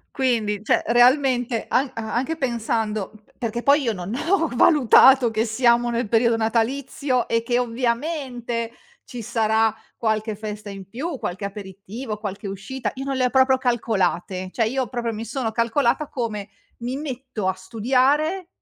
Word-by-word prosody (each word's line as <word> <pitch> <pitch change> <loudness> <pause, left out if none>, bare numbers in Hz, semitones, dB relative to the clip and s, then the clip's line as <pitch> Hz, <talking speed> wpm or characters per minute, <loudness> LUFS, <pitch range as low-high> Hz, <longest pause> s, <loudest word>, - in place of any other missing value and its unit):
Quindi, 225 -6 0
cioè, - - +2
realmente, 245 0 +3
a 265 0 +1
anche 240 +8 -2
pensando, 225 -6 -1
uhm, 215 - -18 0.2
perché 235 0 -3
poi 285 +1 +4
io 230 -3 0
non 185 +1 -6
ho 330 +3 +1
valutato 260 -2 +6
che 220 +1 0
siamo 235 +1 +3
nel 235 -2 -1
periodo 230 +1 +3
natalizio 250 +3 0
e 230 0 +1
che 240 +1 +1
ovviamente 240 -1 -2 0.3
ci 240 -2 -8
sarà 220 -1 +1 0.2
qualche 220 -1 -1
festa 210 0 -7
in 195 -1 -9
più, 275 - -4
qualche 185 +3 -4
aperitivo, 200 +3 -6
qualche 200 -1 -5
uscita, 200 +7 -4
io 270 +1 -5
non 275 -1 -2
le 255 -1 +2
ho - - -1
proprio 265 0 +4
calcolate. 190 -7 -1
Cioè, 225 -2 +1
io 260 +2 -1
proprio 235 -1 -3
mi 220 +2 -5
sono 235 -1 -3
calcolata 235 +5 +1
come: 220 -7 -4 0.3
"Mi 245 +2 -4
metto 260 -7 -5
a - - +3
studiare 265 - +1
235 Hz, 155 wpm, -23 LUFS, 220-260 Hz, 0.3 s, valutato